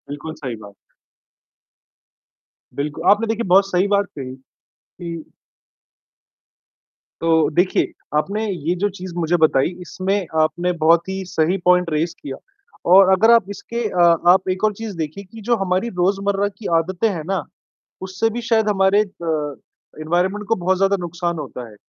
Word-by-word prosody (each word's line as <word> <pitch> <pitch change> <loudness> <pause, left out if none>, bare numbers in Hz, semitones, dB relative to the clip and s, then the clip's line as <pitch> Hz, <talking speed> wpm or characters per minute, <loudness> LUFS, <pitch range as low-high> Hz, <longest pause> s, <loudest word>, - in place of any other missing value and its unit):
बिल्कुल 150 +2 -6
सही 130 -4 -4
बात। 100 - -13 2.0
बिल्कु 145 +2 -4
आपने 215 +2 +2
देखिए 225 -1 -2
बहुत 195 +2 +5
सही 185 +2 +2
बात 200 0 +2
कही 130 -2 -6 0.4
कि 170 -2 -8 2.0
तो 165 -1 +3
देखिये 180 +4 +1 0.3
आपने 205 +8 -1
ये 175 -1 -2
जो 205 - +3
चीज़ 185 -2 -9
मुझे 175 0 +1
बताई 155 -4 +3
इसमें 190 +2 -2 0.2
आपने 175 +3 0
बहुत 170 +3 +4
ही 190 0 -3
सही 175 +1 0
पॉइंट 180 -1 +4
रेज़ 160 +3 -1
किया 135 -2 -6 0.5
और 190 +1 +8
अगर 225 +5 +5
आप 230 -4 +4
इसके 235 +4 -5
अ, 180 -2 0 0.3
आप 185 +1 +5
एक 185 +2 -2
और 215 -1 +3
चीज़ 215 -1 -7
देखिए 160 +5 -5
कि 220 +4 -13
जो 240 - +5
हमारी 190 +3 -1
रोज़मर्रा 200 +2 +1
की 215 - -5
आदतें 180 +6 0
हैं 170 -6 -4
ना, 190 -4 -1 0.6
उससे 190 +4 -1
भी 235 +2 -4
शायद 220 -2 +3
हमारे 195 0 +3
अ, 160 -7 -4 0.5
एनवायरनमेंट 180 +6 -1
को 225 - +3
बहुत 185 +1 0
ज़्यादा 195 +1 +2
नुकसान 175 0 -3
होता 125 -5 -7
है। - - -15
185 Hz, 155 wpm, -20 LUFS, 165-200 Hz, 2.0 s, और